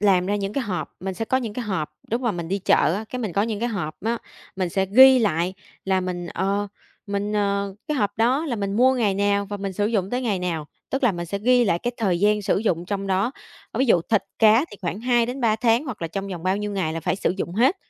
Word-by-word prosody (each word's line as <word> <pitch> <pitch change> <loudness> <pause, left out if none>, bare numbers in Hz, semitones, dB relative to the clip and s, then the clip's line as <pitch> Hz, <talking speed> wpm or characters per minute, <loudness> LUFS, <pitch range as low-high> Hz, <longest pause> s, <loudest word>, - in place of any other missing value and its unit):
làm 190 -3 +3
ra 205 +1 0
những 200 0 -3
cái 275 -3 -1
hộp, 185 -4 -3
mình 190 +1 -4
sẽ 225 - -3
có 260 - +1
những 230 -5 -2
cái 245 +1 -4
hộp 185 -8 -2 0.2
lúc 235 +2 0
mà 235 -3 +1
mình 170 -2 -5
đi 195 +2 0
chợ 165 -3 +3
á, 215 +2 -3
cái 250 - -5
mình 210 -7 -3
có 200 - +2
những 220 -1 -2
cái 240 - 0
hộp 175 -8 -3
á, 230 +1 0 0.4
mình 185 -2 0
sẽ 190 +2 0
ghi 260 +5 +8
lại 185 -4 0 0.3
là 190 -1 +1
mình, 180 -1 -4
ờ, 200 +3 -1 0.4
mình, 200 +1 -2
ờ, 200 -1 0
cái 300 - 0
hộp 205 -4 0
đó 255 +7 +2
là 240 -5 -2
mình 200 -1 -2
mua 260 +2 +5
ngày 215 -6 +1
nào 200 0 +1
và 205 0 -5
mình 195 -1 -4
sử 205 +2 0
dụng 200 -4 0
tới 250 +1 -1
ngày 205 -6 0
nào, 165 -4 -3 0.2
tức 270 - -1
là 225 - +4
mình 175 0 -5
sẽ 200 +4 -3
ghi 245 +3 +4
lại 170 -4 +2
cái 245 +5 -2
thời 190 -6 0
gian 210 0 +3
sử 195 - +1
dụng 180 -6 0
trong 195 +1 -3
đó, 195 +7 +1 0.4
ờ, - - -4
ví 265 - +4
dụ 180 -7 +5
thịt 215 - +3 0.2
cá 225 +5 +6
thì 205 - -10
khoảng 180 +4 -3
2-3 240 -1 +1
tháng 235 +4 +2
hoặc 240 - -6
là 165 - -2
trong 195 +3 -4
vòng 175 -3 -6
bao 185 +1 +1
nhiêu 210 0 -3
ngày 175 -5 -1
là 165 - -3
phải 185 - -1
sử - - 0
dụng 175 - -3
hết. 260 - +3
205 Hz, 275 wpm, -23 LUFS, 185-230 Hz, 0.4 s, ghi